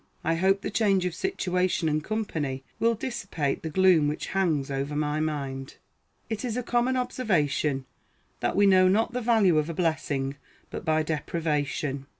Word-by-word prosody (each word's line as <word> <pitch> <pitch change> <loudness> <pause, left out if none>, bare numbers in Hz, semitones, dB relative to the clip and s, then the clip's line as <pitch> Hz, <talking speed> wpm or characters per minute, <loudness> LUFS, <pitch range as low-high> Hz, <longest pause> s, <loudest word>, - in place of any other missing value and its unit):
I 165 - +1
hope 190 +4 +2
the - - -4
change 200 -4 +2
of 180 - -1
situation 180 - 0
and 155 0 0
company 155 -12 -3 0.2
will 230 0 +3
dissipate 205 - -3
the 160 - -4
gloom 180 -3 +4
which 150 - -2
hangs 160 -8 +1
over 140 +2 -2
my 150 0 0
mind. 140 -3 -3 0.5
It 220 +1 -4
is 245 -2 -2
a 250 - -1
common 245 +2 +1
observation, 155 - 0 0.5
that - - -1
we 205 - +5
know 185 -1 +6
not 220 +5 +2
the 250 - -2
value 220 -8 +4
of 155 +2 -2
a 165 - -4
blessing 145 -5 -1 0.3
but - - -5
by 155 -2 +2
deprivation. 150 -3 -2
165 Hz, 165 wpm, -27 LUFS, 150-205 Hz, 0.5 s, know